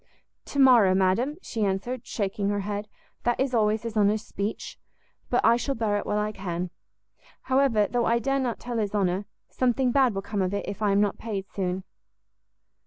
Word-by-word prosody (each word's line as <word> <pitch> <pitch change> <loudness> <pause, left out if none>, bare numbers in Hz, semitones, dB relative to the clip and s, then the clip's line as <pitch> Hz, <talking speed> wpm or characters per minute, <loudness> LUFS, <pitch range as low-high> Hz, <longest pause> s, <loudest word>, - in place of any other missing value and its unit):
"To - - -7
morrow, 240 -9 +6
madam," 195 +10 +2
she 225 -3 -3
answered, 215 +6 -2
shaking 200 -1 -2
her 205 0 0
head, 205 +1 -4 0.3
"that 240 0 0
is 265 -1 0
always 215 -1 +2
his 230 -1 -5
honour's 210 0 +2
speech: 200 +2 -5 0.5
but 245 - +2
I 230 +1 +6
shall 275 +3 -2
bear 215 -2 0
it - - -7
while 210 - 0
I 210 0 0
can. 180 -3 -4 0.7
However, 260 -5 +3
though 240 -1 0
I 235 - +3
dare 275 +4 0
not 250 -3 -2
tell 240 -1 -3
his 210 -1 -2
honour, 190 0 0 0.3
something 255 0 +1
bad 260 -5 +3
will 195 - -3
come 200 0 -2
of 190 +1 0
it, 200 - -3
if 205 +2 -6
I 210 -2 +2
am 200 +1 +3
not 205 -2 0
paid 205 -4 -4
soon." 185 -1 -2
210 Hz, 195 wpm, -26 LUFS, 200-240 Hz, 0.7 s, morrow